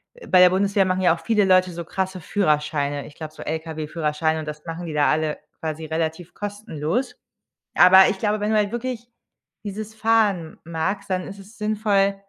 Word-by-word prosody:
äh, - - -13
bei 185 - +5
der 180 0 +8
Bundeswehr 195 +1 +2
machen 185 0 0
ja 180 -3 +5
auch 165 - -12
viele 210 -3 +2
Leute 185 -1 +4
so 170 -1 -6
krasse 190 0 -3
Führerscheine. 150 -5 0
Ich - - -12
glaube, 155 -1 -7
so - - -9
LKW-Führerscheine 160 0 -2
und 155 - -7
das 150 0 -7
machen 170 +1 -6
die 155 - -5
da 150 -1 +3
alle 155 0 0 0.2
quasi 160 0 -4
relativ 160 +2 -3
kostenlos. 205 - -3 0.6
Aber, 190 +1 +8
ich 190 - -3
glaube, 210 0 0
wenn 210 +1 0
du 215 - +3
halt 205 0 +1
wirklich 240 -1 -4 0.5
dieses 215 +1 -6
Fahren 210 -8 +1
magst, 175 +5 -3
dann 185 -1 -1
ist 200 0 -9
es 200 +5 -15
sinnvoll, 210 -2 +1
185 Hz, 190 wpm, -23 LUFS, 160-205 Hz, 0.6 s, der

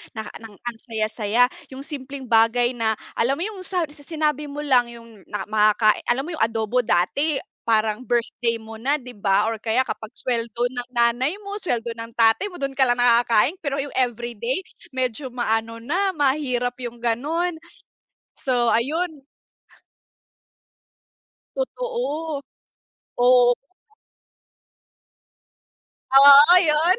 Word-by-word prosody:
na 220 - -3 0.2
ng 225 -3 -12
ang 240 +1 -7
saya-saya, 225 +1 0 0.2
yung 265 +1 -8
simpleng 280 -2 -6
bagay 235 +1 +3
na 225 -3 -1 0.2
alam 255 +4 +2
mo 335 - -4
yung 415 -2 -5
sa 360 -3 0
sinabi 300 -1 -3
mo 290 +1 -6
lang 250 -4 +3
yung 230 -4 -13
na 205 -2 -4
makakai 215 0 +3
alam 260 +3 +1
mo 345 - -7
yung - - 0
adobo 225 +2 0
dati 245 - +1 0.3
parang 220 +1 +1
birthday 235 -1 0
mo 220 0 -11
na 270 +7 0
'di 250 -2 -10
'ba 205 +1 +2
or 225 - -1
kaya 230 +3 +1
kapag 220 +1 -6
sweldo 235 -1 -2
ng 245 -1 -5
nanay 240 +7 +1
mo, 400 +1 -6
sweldo 235 - -2
ng 230 0 -8
tatay 225 - +3
mo, 355 - -10
dun 275 -1 -3
ka 265 - +4
lang 245 0 +1
nakakain 240 - +3
pero 280 -1 -2
yung 280 +1 -3
everyday 240 - -1 0.3
medyo 260 0 -3
maano 230 -1 -2
na 380 +8 0
mahirap 260 -4 0
yung 240 0 -7
ganon, 320 +9 -1 0.9
so 245 -4 +1
ayun. 305 +6 -1 2.4
Totoo, 470 - -3 0.8
oo. 245 -1 +6 2.6
Oo 280 +4 +9
'yon. 325 +3 +3
245 Hz, 130 wpm, -22 LUFS, 230-290 Hz, 2.6 s, Oo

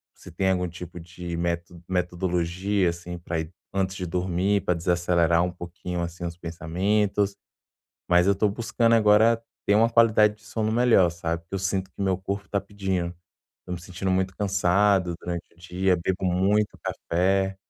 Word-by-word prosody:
se - - -13
tem 95 +3 0
algum 90 -1 0
tipo 85 0 -9
de 85 +1 -7
méto 85 0 -3
metodologia, 90 +1 0
assim, 85 +1 -6
pra 85 -1 -3
ir 80 +1 -5 0.2
antes 95 0 0
de 95 - -4
dormir, 90 +3 0
pra 90 - +2
desacelerar 85 0 +2
um 90 - -1
pouquinho, 90 0 -6
assim, 85 +1 -5
os 85 0 -5
pensamentos, 95 +5 0 0.7
mas 90 0 +5
eu 100 - +5
tô 105 +2 +2
buscando 115 +2 +1
agora 110 +1 +5 0.2
ter 100 - +4
uma 115 +2 +4
qualidade 110 -2 +4
de 105 - -24
sono 110 +1 -2
melhor, 115 -7 +4
sabe, 85 0 -3
porque 85 +3 -10
eu - - 0
sinto 95 0 -1
que - - -13
meu 95 -1 +2
corpo 100 +1 -4
tá 100 - 0
pedindo, 95 -3 -3 0.5
tô 90 - -5
me 90 - -4
sentindo 90 +2 -4
muito 95 0 0
cansado 100 -2 +2
durante 85 -1 -5
o - - -28
dia, 90 +2 0
bebo 90 +2 -2
muito 100 +4 +1
café. 95 +2 0
90 Hz, 175 wpm, -25 LUFS, 85-100 Hz, 0.7 s, mas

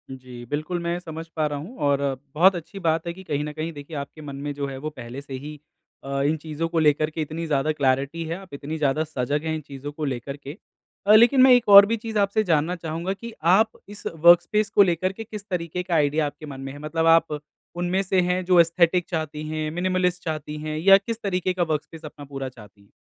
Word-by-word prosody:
जी, 125 -2 -11
बिल्कुल, 155 +4 -2
मैं 170 0 -2
समझ 165 -2 -8
पा 155 -1 +1
रहा 145 -1 -4
हूँ 185 - -9
और 140 0 +2 0.3
बहुत 185 +4 +5
अच्छी 175 +4 -7
बात 165 -1 0
है 170 - -2
कि 190 +2 -12
कहीं 145 -4 -2
न 150 - -4
कहीं 160 +2 -4
देखिए, 145 +1 -8
आपके 140 +2 -7
मन 140 -2 -7
में 145 +1 -4
जो 140 0 -3
है, 135 -1 -6
वो 150 +3 -4
पहले 130 -2 -8
से 140 -1 -10
ही 150 +3 -7 0.4
अ, 140 0 -2
इन 150 +3 +1
चीज़ों 155 +1 -4
को 165 -1 0
लेकर 155 0 +3
के 160 +1 -5
इतनी 160 +2 -4
ज़्यादा 150 0 +1
क्लैरिटी 140 +2 0
है, 165 +1 -3
आप 190 -3 -14
इतनी 145 +3 -5
ज़्यादा 150 0 +1
सजग 145 -1 -2
हैं 160 - -1
इन 155 - -5
चीज़ों 140 0 -8
को 150 +1 -4
लेकर 135 +1 -4
के। 140 +3 -9 0.5
अ, 210 - +7
लेकिन 240 +4 +6
मैं 260 0 +8
एक 245 -1 +3
और 200 0 +11
भी 230 +3 -1
चीज़ 220 0 -5
आपसे 200 +2 +2
जानना 165 -1 +1
चाहूँगा 165 +2 -4
कि 230 +4 -9 0.2
आप 220 +3 +4 0.2
इस 205 0 -11
वर्क 170 +2 +7
स्पेस 210 +4 0
को 200 - +6
लेकर 185 0 0
के 225 - -7
किस 210 -2 -9
तरीके 180 -1 -3
का 180 -2 -1
आइडिया 150 0 +2
आपके 145 +1 -7
मन 135 -2 -8
में 135 0 -6
है? 145 - -10
मतलब 155 +2 -2
आप 155 -2 -2 0.4
उनमें 175 +2 0
से 190 -1 +2
हैं, 180 +1 0
जो 180 -1 +5
एसथेटिक 170 +1 +3
चाहती 155 -2 -4
हैं, 155 0 -3
मिनिमलिस्ट 180 +1 0
चाहती 155 -1 -4
हैं, 155 0 -4
या 195 +5 +7
किस 225 +3 -6
तरीके 185 -2 -1
का 180 -1 0
वर्क 155 -3 -1
स्पेस 165 -1 -13
अपना 145 -1 -10
पूरा 135 -1 -5
चाहती 105 -5 -16
हैं? 100 - -26
160 Hz, 245 wpm, -24 LUFS, 145-180 Hz, 0.5 s, और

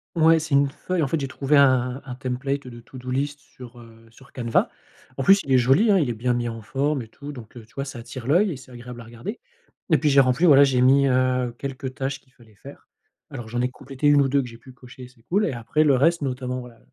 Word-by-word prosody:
Ouais, 165 0 +5
c'est 155 -2 -4
une 140 0 +4
feuille. 175 +5 -3
En 150 - +1
fait, 160 +4 -1
j'ai 135 - -3
trouvé 135 +2 +1
un 130 -2 +3
un 130 - -6
template 130 +2 -4
de 120 -1 -10
to-do 130 +1 -10
list 140 +3 -2
sur, 125 -3 -14
heu, 115 -1 -16
sur 135 +4 -19
Canva. 120 -2 0 0.5
En 135 - -1
plus, 195 +6 +6
il 140 - -6
est 130 - +6
joli, 135 - +3
hein. 200 - +5
Il 155 -7 +1
est - - -1
bien 120 +3 -1
mis 120 0 -2
en 115 -1 -7
forme 140 +5 -1
et 115 - -10
tout, 145 +6 -10
donc, 120 -4 -12
heu, 115 - -11
tu 110 - -27
vois? 135 - -4
Ça 140 -2 -8
attire 120 +1 -9
l'œil 180 +8 +3
et 150 - -6
c'est 130 0 -15
agréable 120 0 -10
à - - -12
regarder 120 - -8 0.5
et 160 - +5
puis, 150 - +1
j'ai 140 -1 +6
rempli, 130 +6 +2
voilà, 140 -4 +7
j'ai 135 -3 +2
mis, 135 +2 +5
heu, 125 -1 +1
quelques 135 -1 -5
tâches 135 +1 -4
qu'il 130 - -31
fallait 115 -5 -21
faire. 100 - -14 0.4
Alors, 115 -2 -8
j'en 120 +2 -3
ai 125 - +1
complétées 135 +2 -4
1 145 -1 +5
ou 135 - +1
2 140 +1 +2
que 125 - -7
j'ai 115 -1 -12
pu 130 +3 -15
cocher, 125 0 -13
c'est 120 -3 -25
cool, 200 - 0
et 165 - -1
après 120 +6 0
le 145 -2 +4
reste, 165 +6 +2
notamment, 130 -2 -3
voilà, 120 -2 -14
130 Hz, 270 wpm, -23 LUFS, 125-140 Hz, 0.5 s, voilà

